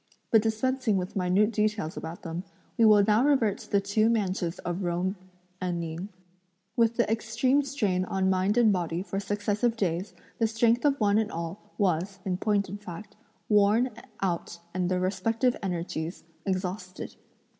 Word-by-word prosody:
But 225 - +6
dispensing 225 0 +1
with 180 0 -4
minute 195 +3 +3
details 210 -6 0
about 160 +2 -7
them, 165 +1 -4 0.3
we 230 - +4
will 210 -2 +7
now 215 +3 +4
revert 265 -8 +3
to - - -13
the 200 - +4
two 205 +3 +2
mansions 190 -6 0
of 175 +2 -4
Jung 180 +1 0 0.5
and 175 -2 -1
Ning. 170 +4 -5 0.7
With 230 -1 +3
the 235 - +3
extreme 230 +5 +2
strain 210 -10 0
on 190 0 0
mind 190 +3 +2
and 225 -4 +5
body 175 -1 -1
for 195 0 -3
successive 205 +3 0
days, 180 -1 -1 0.2
the 225 - +3
strength 230 +3 +2
of 280 -1 +3
one 205 -1 +3
and 220 0 -1
all 170 +4 -4 0.2
was, 190 -1 0
in 185 -2 0
point 205 0 +1
of 200 +3 -7
fact, 205 +2 -9 0.3
worn 210 +4 +4 0.3
out 175 -2 -2 0.2
and 180 -1 0
their 185 -1 +1
respective 225 +7 +1
energies 170 -2 -3 0.2
exhausted. 185 0 -3
200 Hz, 165 wpm, -28 LUFS, 180-220 Hz, 0.7 s, will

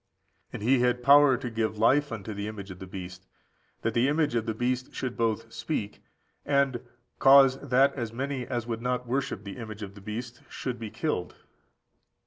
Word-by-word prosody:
And - - -6
he 130 +3 +4
had 125 0 +1
power 140 -1 +7
to 125 -1 -5
give 110 -1 -1
life 135 +6 +3
unto 110 -1 -5
the 100 +1 -4
image 100 -3 -7
of 90 - -10
the 95 - -8
beast, 95 0 -9 0.6
that 115 - 0
the 120 +3 +3
image 150 -1 +1
of 115 -1 -1
the 110 - -1
beast 125 +2 -2
should 125 -2 -3
both 115 0 -1
speak, 105 -10 -4 0.4
and 140 -4 +1 0.4
cause 135 -1 +7
that 135 0 +3
as 120 -5 -4
many 130 +1 -3
as 120 -3 -2
would 115 -1 -4
not 125 0 -1
worship 125 -5 -2
the 100 +2 -8
image 110 -3 -7
of 100 -1 -7
the 100 - -13
beast 115 +4 -6
should 125 -3 -5
be 110 -2 -5
killed. 150 - -3
120 Hz, 190 wpm, -28 LUFS, 110-130 Hz, 0.6 s, power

